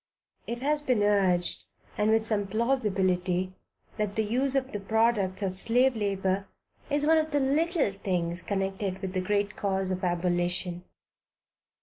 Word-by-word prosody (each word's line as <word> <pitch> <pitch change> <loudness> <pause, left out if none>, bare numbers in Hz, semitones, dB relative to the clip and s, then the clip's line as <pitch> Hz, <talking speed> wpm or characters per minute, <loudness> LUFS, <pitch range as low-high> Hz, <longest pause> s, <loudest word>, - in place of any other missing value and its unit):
It 235 +1 -4
has 295 +1 +1
been 250 -7 +1
urged, 190 -4 +2 0.3
and 210 +1 +1
with 220 0 +3
some 210 -3 0
plausibility, 190 -6 0 0.4
that 210 -2 -2
the 220 - +1
use 255 +6 0
of 265 -1 0
the 205 - -3
products 210 -2 +1
of 185 -1 -1
slave 250 +4 +3
labor, 195 -2 -1 0.4
is 290 0 +1
one 320 +1 +5
of 315 0 -1
the 290 -1 +1
"little 300 - +1
things" 180 -3 -1
connected 195 -1 -2
with 185 -1 -3
the 185 - 0
great 205 +2 0
cause 190 -1 0
of 185 0 -3
abolition. 175 0 -1
200 Hz, 150 wpm, -28 LUFS, 185-235 Hz, 0.4 s, one